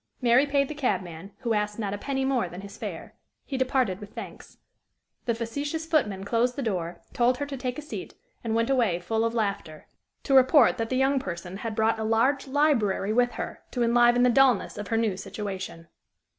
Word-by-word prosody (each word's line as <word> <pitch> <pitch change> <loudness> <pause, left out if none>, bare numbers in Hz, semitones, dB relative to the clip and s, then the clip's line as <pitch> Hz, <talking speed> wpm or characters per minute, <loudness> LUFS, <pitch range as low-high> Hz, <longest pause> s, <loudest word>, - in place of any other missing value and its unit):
Mary 250 +3 +4
paid 280 -1 +2
the 305 - -5
cabman, 190 - -3
who 235 -3 0
asked 210 0 -1
not 205 -3 -2
a - - -3
penny 270 +3 -2
more 255 -9 0
than 180 +2 -8
his 200 0 -10
fare; - - -7 0.3
he 275 - -5
departed 255 -7 +1
with 205 0 -11
thanks; - - -9 0.7
the 235 - 0
facetious 285 +8 -3
footman 230 - 0
closed 235 +4 +1
the 280 - -3
door, 175 -6 -3
told 245 +1 +2
her 285 - -2
to 285 -1 -6
take 255 -1 -4
a 300 - -6
seat, 300 - -7 0.3
and 225 -1 -1
went 230 +3 +1
away 230 -10 +2
full 220 +6 -1
of 230 +1 -1
laughter, 200 -8 -3 0.4
to 275 - -1
report 260 -1 +6
that 225 0 -1
the 255 - 0
young 270 +1 +3
person 180 -3 -6
had 220 +1 -5
brought 220 0 +2
a - - -2
large 235 +6 +2
library 255 -8 +2
with 245 +1 +2
her - - -6
to 245 - -1
enliven 240 +1 +4
the 250 - +5
dullness 255 -4 +3
of 205 0 -6
her 225 - 0
new 220 -4 +1
situation. 190 -4 -6
230 Hz, 205 wpm, -26 LUFS, 205-265 Hz, 0.7 s, report